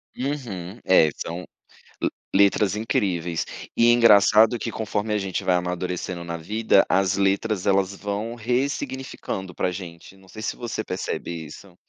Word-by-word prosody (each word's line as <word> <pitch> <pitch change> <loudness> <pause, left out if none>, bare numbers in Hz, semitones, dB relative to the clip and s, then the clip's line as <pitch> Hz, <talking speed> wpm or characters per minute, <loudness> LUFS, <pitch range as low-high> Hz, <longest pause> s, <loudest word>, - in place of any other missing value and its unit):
Uhum, 120 -8 -4
é 80 -4 +6
são 85 +2 -5 0.6
le - - +1 0.3
letras 100 0 +4
incríveis, 90 -6 -1 0.3
e 120 0 +5
engraçado 110 0 +6
que 115 - -3
conforme 110 0 -2
a 105 - +2
gente 95 -2 -3
vai 90 - +3
amadurecendo 90 0 -3
na 85 0 -4
vida, 105 +4 +2
as 95 +1 +2
letras 100 0 +1
elas 100 0 +2
vão 105 +4 -4
ressignificando 125 -5 -3
pra 90 - 0
gente, 90 0 -9
não 95 0 -20
sei 110 +4 -9
se - - -2
você 120 -2 -4
percebe 90 -2 -4 0.2
isso. 90 +4 -13
100 Hz, 145 wpm, -24 LUFS, 90-110 Hz, 0.6 s, é